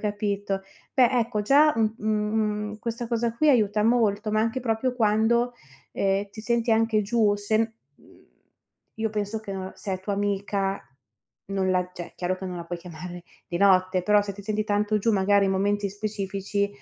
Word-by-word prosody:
capito. 205 -2 -2 0.3
Beh, 255 -3 +5
ecco 230 -4 0
già 290 +7 +5
un 220 -1 +1
u - - -10
mhmm, 210 0 -1
questa 235 +1 -4
cosa 235 0 0
qui 310 +5 +3
aiuta 210 -5 +3
molto, 220 -2 +2
ma 215 - +3
anche 230 +3 0
proprio 245 +1 -1
quando, 230 +2 +2 0.4
ehm, 195 +1 0
ti 215 - -9
senti 235 +1 +1
anche 225 -1 +2
giù, 210 0 +2
se 205 +1 0
n 225 0 +1 0.3
uhm, - - -21 0.7
io 220 0 -2
penso 210 +1 -2
che, 215 -2 -7
ehm, 190 -1 -5
se 195 - -5
è 185 - -3
tua 200 +2 -2
amica, 200 -1 -1 0.7
non 190 -1 +1
la 180 -1 +1
cioè, 175 -1 -8
chiaro 180 +1 -1
che 190 - -6
non 180 -1 -5
la 170 - -6
puoi 175 +1 -5
chiamare 175 +1 -9 0.2
di 175 - -3
notte, 185 -1 +4
però 210 +2 +4
se 200 0 -5
ti 200 +1 -11
senti 215 +1 -1
tanto 210 +1 +1
giù 225 +2 +1
magari 200 0 +3
in 195 - +1
momenti 200 +1 0
specifici 200 0 -2
210 Hz, 190 wpm, -25 LUFS, 195-220 Hz, 0.7 s, Beh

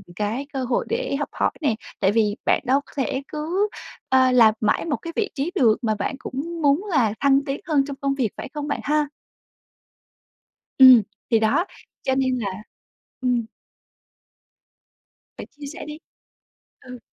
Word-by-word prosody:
cái 215 +8 -2
cơ 265 -1 -2
hội 250 -1 0
để 475 - -1
học 290 - -3
hỏi - - 0
nè, 280 -8 +1 0.2
tại 190 - +3
vì 210 -1 +2
bạn - - +3
đâu 265 +2 +3
có - - -19
thể 270 0 -1
cứ, 340 +7 -1 0.4
ơ, 260 -1 +4
làm 230 -3 +6
mãi 215 - +1
một 305 -3 -1
cái 335 -1 -8
vị 415 -2 0
trí 290 +5 -2
được 230 - +4
mà 220 -3 0
bạn 205 +6 -3
cũng 330 +6 -5
muốn 290 +6 +3
là 235 - +2
thăng 275 -1 +4
tiến 275 0 -3
hơn 290 -4 +2
trong 280 -1 -6
công 275 -1 0
việc, 250 -6 0
phải - - -6
không 295 -1 -4
bạn 290 - -2
ha? 300 0 +1 1.7
Ừm. 260 -3 +9 0.3
Thì 230 -2 +4
đó. 220 +11 +2 0.4
Cho 265 - 0
nên 260 -1 +1
là 215 - -2 0.7
ừm. 245 -2 +1 1.9
Bạn - - -8
chia 290 0 -12
sẻ 335 - -8
đi. 300 0 -7 0.8
Ừ. 250 -1 -10
270 Hz, 170 wpm, -23 LUFS, 240-300 Hz, 1.9 s, Ừm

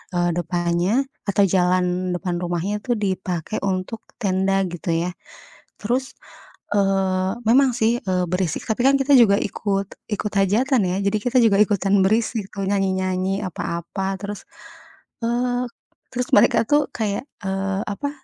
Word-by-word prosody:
eee, 175 0 +2
depannya 175 +2 0 0.4
atau 200 0 +3
jalan 180 0 +1
depan 180 -1 -3
rumahnya 175 +4 -2
itu 250 - -3
dipakai 185 -2 -2
untuk 190 +4 -2 0.2
tenda 195 0 +1
gitu 175 0 -6
ya. 170 +2 0 0.7
Terus, 250 +5 -1 0.6
eee, 190 -1 +1 0.2
memang 265 +1 +5
sih, 230 0 +2
eee, 185 -2 0
berisik, 180 -3 -1
tapi 220 +2 0
kan 275 - +5
kita 280 +1 +3
juga 210 -5 +6
ikut, 200 -1 -2 0.2
ikut 210 0 -2
hajatan 225 +6 +2
ya, 180 - -1
jadi 200 +2 +2
kita 250 +1 +2
juga 200 -3 +4
ikutan 200 -1 +3
berisik, 220 0 0
nyanyi-nyanyi, 190 0 0
apa-apa. 185 +3 -4
Terus, 205 0 -6 0.8
eee, 245 +1 0 0.5
terus 250 0 -2
mereka 230 +2 +5
tuh 295 -1 +3
kayak, 210 0 -2 0.2
eee, 195 +1 -1
apa, 245 +8 -3
195 Hz, 135 wpm, -22 LUFS, 185-220 Hz, 0.8 s, juga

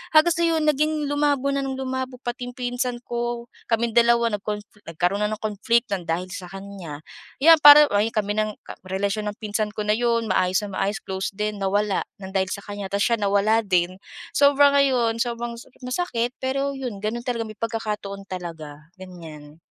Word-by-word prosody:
hanggang 325 +2 +6
sa 340 - 0
'yon, 325 -2 +2
naging 300 0 +1
lumabo 285 -1 +1
na - - +1
ng 270 -1 -3
lumabo 260 -1 -3
pati 245 +1 -4
yung - - -24
pinsan 245 0 -2
ko, 240 0 -3 0.2
kaming 230 +1 +1
dalawa 235 0 +5
nagkon 210 0 -3 0.3
nagkaroon 175 +4 0
na 210 - 0
ng 215 - -4
conflict 225 +3 +1
ng 185 - -6
dahil 175 +3 -1
sa 180 - -7
kanya. 195 -6 -8 0.4
Iyan 325 0 +8
parang 295 0 +10
ay 210 +3 +2
kami 205 -1 -1
ng 215 -1 -1 0.3
relasyon 200 +3 -1
ng 205 - -16
pinsan 210 0 -2
ko 210 - -2
na 210 - +3
'yon. 230 -1 +1
Maayos 185 +2 +2
na 195 - -8
maayos, 200 +2 -1
close 190 0 -3
din, 210 0 -2
nawala 205 +1 +1 0.2
ng 190 - -7
dahil 190 0 +2
sa 200 - -4
kanya. 205 -1 -6
Ta's 200 +1 0
siya 235 - +3
nawala 205 +3 +3
din. 180 -2 +1 0.4
Sobra 285 0 +5
ngayon, 245 -5 +2
sobrang 235 -1 -4
so - - -14 0.2
masakit. 250 -4 -1
Pero 275 +2 -1
'yon, 250 -7 -5
gano'n 220 +4 -3
talaga, 235 -2 -2
may 215 - -9
pagkakataon 210 -3 -4
talaga, 160 -4 -8
ganyan. 160 -4 -11
220 Hz, 185 wpm, -23 LUFS, 195-250 Hz, 0.4 s, parang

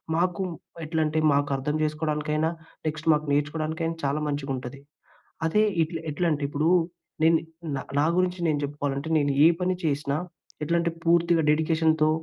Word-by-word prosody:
మాకు 180 +3 0 0.4
ఎట్లంటే 155 0 0
మాకు 145 +1 +2
అర్థం 145 +3 -2
చేసుకోవడానికైనా, 155 0 0 0.4
నెక్స్ట్ 155 +1 -2
మాకు 150 0 0
నేర్చుకోవడానికైనా 160 +3 -1
చాలా 140 +2 0
మంచిగా 145 -1 -2
ఉంటది. 125 +2 -7 0.7
అదే 210 +6 +3 0.2
ఇట్లా 165 0 -5
ఎట్లా 170 +4 0
అంటే, 145 -1 -1
ఇప్పుడు 150 +3 +1 0.5
నేను 165 0 +6 0.6
నా 150 - +3
గురించి 185 0 +1
నేను 150 -2 +1
చెప్పుకోవాలంటే, 145 +1 -3
నేను 145 -1 +1
ఏ - - +10
పని 185 0 +1
చేసినా, 145 -1 0 0.5
ఎట్లంటే 170 +2 +1
పూర్తిగా 170 0 +3
డెడికేషన్‌తో, 160 0 +2
155 Hz, 135 wpm, -26 LUFS, 145-165 Hz, 0.7 s, ఏ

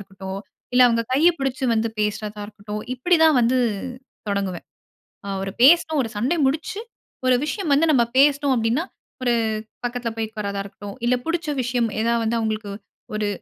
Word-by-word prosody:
இருக்கட்டும், 195 -1 -7 0.4
இல்ல 255 - +5
அவுங்க 230 0 +1
கைய 310 +6 +5
பிடிச்சு 270 -1 -2
வந்து 225 0 +1
பேசுறதா 210 0 -2
இருக்கட்டும், 210 0 -7
இப்பிடிதான் 320 +2 +4
வந்து, 250 +2 +3 0.7
தொடங்குவேன். 195 -3 -2 0.6
அ - - -6
அவரு 195 0 -3
பேசணும் 315 0 +6
ஒரு 225 - -4
சண்டை 265 +11 +1
முடிச்சு, 320 +11 -1 0.5
ஒரு 255 - +5
விஷயம் 320 +1 -2
வந்து 320 +4 +4
நம்ம 240 -4 +4
பேசினோம் 280 0 +4
அப்பிடின்னா, 235 +9 0 0.4
ஒரு 245 - +2 0.5
பக்கதுல 240 -1 -3
போய் 220 -1 -2
உக்காரதா 200 -2 -4
இருக்கட்டும், 200 0 -9
இல்ல 250 +1 +3
புடுச்ச 335 0 -2
விஷயம் 245 -2 0
ஏதா 235 +1 +2
வந்து 230 +1 +1
அவுங்களுக்கு 215 -2 -3 0.4
ஒரு 210 -1 -1
235 Hz, 155 wpm, -22 LUFS, 210-280 Hz, 0.7 s, பேசணும்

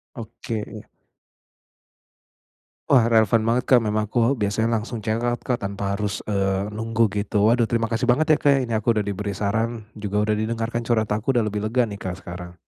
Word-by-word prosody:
Oke. 115 -2 -6 2.0
Wah, 130 -5 +5
relevan 110 0 +4
banget, 120 +2 +1
Kak. 125 -2 +6
Memang 105 0 0
aku 120 +2 +2
biasanya 105 +2 0
langsung 115 +2 -6
checkout, 120 +2 -1
Kak, 125 -2 -1
tanpa 100 0 -3
harus, 100 -2 -3
eee, 100 -1 -1
nunggu 115 0 0
gitu. 105 0 0
Waduh, 120 -1 +2
terima 115 -1 0
kasih 120 +2 -1
banget 150 +6 +3
ya, - - -2
Kak, 140 -1 +4
ini 115 - -5
aku 110 +1 +1
udah 105 - +1
diberi 100 0 -3
saran 110 +2 -1
juga 105 0 -2
sudah 105 0 +1
didengarkan 115 +1 -2
curhat 110 -3 +1
aku 115 +5 0
udah 115 - +3
lebih 105 0 -2
lega 125 +3 +2
nih, 100 -1 -7
Kak, 95 0 -6
sekarang. 85 0 -8
110 Hz, 180 wpm, -23 LUFS, 105-115 Hz, 2.0 s, Kak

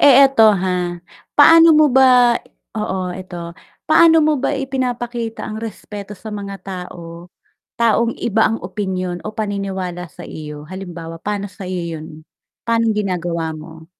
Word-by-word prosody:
Eh, 280 -3 +7
eto, 225 -5 +5
ha, 180 -2 -2 0.4
paano 330 +3 +8
mo 305 0 +6
ba 250 -2 +5 0.4
oo 190 -4 -2
eto, 175 -2 -8 0.3
paano 325 +1 +6
mo 310 0 +3
ba 260 - 0
ipinapakita 245 -4 -3
ang 215 - -5
respeto 210 -2 -7
sa 220 - -8
mga 200 -1 -6
tao 175 -2 -9 0.5
taong 230 0 +2
iba 220 -1 +1
ang 225 - -1
opinyon 185 -1 -4
o 215 - -3
paniniwala 190 -4 -3
sa - - -12
iyo? 150 -1 -8
Halimbawa 170 -3 -8
pa'no 205 -1 -2
sa 200 - -12
iyo 170 -3 -4
'yun, 155 - -9 0.6
pa'nong 230 -1 +2
ginagawa 175 -5 -2
mo? 160 +1 -11
200 Hz, 140 wpm, -19 LUFS, 175-230 Hz, 0.6 s, paano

